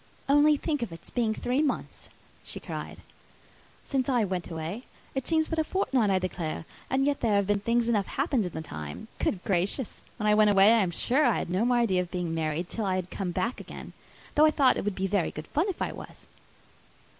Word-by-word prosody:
"Only 290 Hz, +2 st, +5 dB
think 295 Hz, -2 st, -2 dB
of 235 Hz, -, -3 dB
its 165 Hz, -, -10 dB
being 225 Hz, -3 st, 0 dB
three 255 Hz, +4 st, 0 dB
months," 300 Hz, -, -3 dB, 0.3 s
she -, -, -7 dB
cried, -, -, -7 dB, 0.8 s
"since 270 Hz, -1 st, 0 dB
I 245 Hz, -4 st, +3 dB
went 185 Hz, -3 st, -3 dB
away: 170 Hz, +8 st, -5 dB, 0.3 s
it 265 Hz, -2 st, -3 dB
seems 320 Hz, -1 st, +2 dB
but 325 Hz, -, -2 dB
a -, -, +3 dB
fortnight, 265 Hz, -, +1 dB
I 190 Hz, -, +3 dB
declare; 175 Hz, -4 st, -3 dB, 0.2 s
and 265 Hz, +1 st, +2 dB
yet 285 Hz, 0 st, +1 dB
there 220 Hz, -3 st, +2 dB
have 200 Hz, -1 st, +3 dB
been 205 Hz, +1 st, +1 dB
things 230 Hz, +3 st, +1 dB
enough 210 Hz, -5 st, +1 dB
happened 270 Hz, -, 0 dB
in 175 Hz, -, -9 dB
the 160 Hz, -, -5 dB
time. 75 Hz, -, -7 dB
Good 185 Hz, -, -1 dB
gracious! 195 Hz, +6 st, -1 dB, 0.2 s
when 210 Hz, -, -3 dB
I 210 Hz, -, +5 dB
went 210 Hz, 0 st, +5 dB
away, 200 Hz, +2 st, +6 dB
I 230 Hz, -, +4 dB
am 185 Hz, -, +1 dB
sure 255 Hz, -, +1 dB
I 240 Hz, -5 st, +3 dB
had -, -, -3 dB
no 190 Hz, +6 st, +1 dB
more 245 Hz, 0 st, +3 dB
idea 195 Hz, -7 st, +2 dB
of 180 Hz, -, -5 dB
being 175 Hz, -3 st, -3 dB
married 160 Hz, +1 st, -1 dB
till 220 Hz, +2 st, -3 dB
I 185 Hz, -1 st, +1 dB
came 185 Hz, +1 st, -4 dB
back 205 Hz, +8 st, -2 dB
again! -, -, -9 dB, 0.4 s
though 305 Hz, +1 st, +6 dB
I -, -, +6 dB
thought 280 Hz, -4 st, +4 dB
it -, -, -3 dB
would 210 Hz, -2 st, -1 dB
be 190 Hz, -, -1 dB
very 195 Hz, -2 st, +1 dB
good 155 Hz, -, -7 dB
fun 330 Hz, +7 st, +1 dB
if 380 Hz, -, -2 dB
I -, -, -2 dB
was." -, -, -11 dB
210 Hz, 225 wpm, -28 LUFS, 185-265 Hz, 0.8 s, away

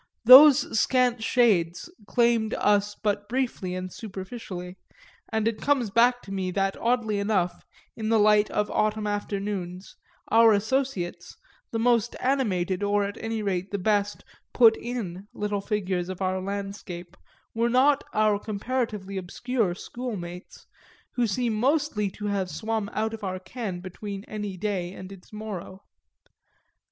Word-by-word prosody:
Those 265 Hz, -2 st, +9 dB
scant 250 Hz, -2 st, +2 dB
shades 200 Hz, -, +2 dB, 0.2 s
claimed 235 Hz, -2 st, +2 dB
us 205 Hz, 0 st, +2 dB
but 205 Hz, -1 st, -2 dB
briefly 240 Hz, -8 st, -2 dB
and 185 Hz, 0 st, -5 dB
superficially, 190 Hz, -3 st, -7 dB, 0.6 s
and 220 Hz, -1 st, 0 dB
it 230 Hz, -2 st, -2 dB
comes 265 Hz, -7 st, +1 dB
back 245 Hz, +3 st, +3 dB
to 195 Hz, -, -10 dB
me 190 Hz, -1 st, -2 dB
that 195 Hz, +1 st, 0 dB
oddly 230 Hz, -3 st, 0 dB
enough, 200 Hz, -4 st, 0 dB, 0.3 s
in 220 Hz, -1 st, -3 dB
the 225 Hz, -, +4 dB
light 210 Hz, 0 st, +4 dB
of 210 Hz, 0 st, -1 dB
autumn 215 Hz, 0 st, 0 dB
afternoons, 200 Hz, -3 st, -4 dB, 0.3 s
our 225 Hz, 0 st, +6 dB
associates, 205 Hz, -5 st, -2 dB, 0.3 s
the 230 Hz, -, -3 dB
most 235 Hz, 0 st, +2 dB
animated 200 Hz, -9 st, 0 dB
or 205 Hz, 0 st, +2 dB
at 200 Hz, 0 st, -4 dB
any 225 Hz, -1 st, -2 dB
rate 190 Hz, -1 st, -2 dB
the 200 Hz, -, -2 dB
best 205 Hz, +1 st, 0 dB, 0.3 s
"put 225 Hz, -3 st, +7 dB
in" 205 Hz, -7 st, -5 dB
little 205 Hz, -1 st, -2 dB
figures 185 Hz, -4 st, -2 dB
of 185 Hz, -, -6 dB
our 185 Hz, -1 st, -1 dB
landscape, 195 Hz, -3 st, -6 dB, 0.4 s
were 230 Hz, +1 st, +1 dB
not 270 Hz, +4 st, +4 dB
our 215 Hz, -1 st, +2 dB
comparatively 210 Hz, -2 st, -3 dB
obscure 195 Hz, +1 st, -2 dB
schoolmates, 190 Hz, -6 st, -7 dB, 0.5 s
who 245 Hz, -2 st, 0 dB
seem 235 Hz, +2 st, 0 dB
mostly 255 Hz, -3 st, +1 dB
to 205 Hz, +2 st, -8 dB
have 200 Hz, -3 st, -1 dB
swum 220 Hz, +1 st, -3 dB
out 220 Hz, +1 st, -1 dB
of 220 Hz, -1 st, -8 dB
our 185 Hz, -1 st, -2 dB
ken 185 Hz, -1 st, -6 dB
between 195 Hz, +2 st, -7 dB
any 210 Hz, -3 st, -5 dB
day 185 Hz, -2 st, -2 dB
and 185 Hz, 0 st, -9 dB
its 190 Hz, -2 st, -14 dB
morrow. 205 Hz, -3 st, -7 dB
210 Hz, 145 wpm, -26 LUFS, 190-230 Hz, 0.6 s, Those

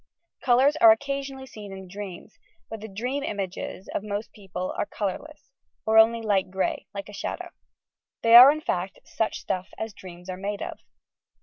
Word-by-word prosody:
Colours 265 Hz, +4 st, +4 dB
are 225 Hz, -7 st, +8 dB
occasionally 275 Hz, +2 st, -2 dB
seen 210 Hz, -5 st, -10 dB
in 190 Hz, -1 st, -9 dB
dreams, 200 Hz, +1 st, -9 dB, 0.3 s
but 225 Hz, -2 st, -6 dB
the 220 Hz, -, -6 dB
dream 245 Hz, +8 st, -3 dB
images 195 Hz, -3 st, -5 dB
of -, -, -1 dB
most 205 Hz, +1 st, -4 dB
people 185 Hz, -3 st, -5 dB
are -, -, -2 dB
colour 200 Hz, -3 st, -3 dB
less, 300 Hz, -3 st, -16 dB, 0.3 s
or 220 Hz, 0 st, +5 dB
only 230 Hz, +1 st, +5 dB
light 195 Hz, -3 st, +1 dB
grey, 190 Hz, 0 st, -2 dB
tike 200 Hz, 0 st, -6 dB
a -, -, -11 dB
shadow. 200 Hz, -, -5 dB, 0.7 s
They 230 Hz, 0 st, +4 dB
are 250 Hz, +4 st, +12 dB
in 310 Hz, +1 st, -3 dB
fact, 185 Hz, -, -2 dB
"such 220 Hz, -, -2 dB
stuff 185 Hz, 0 st, -3 dB
as 220 Hz, -1 st, -5 dB
dreams 180 Hz, -2 st, -12 dB
are 185 Hz, -1 st, -5 dB
made 200 Hz, +1 st, -4 dB
of." -, -, -7 dB
210 Hz, 180 wpm, -26 LUFS, 190-235 Hz, 0.7 s, are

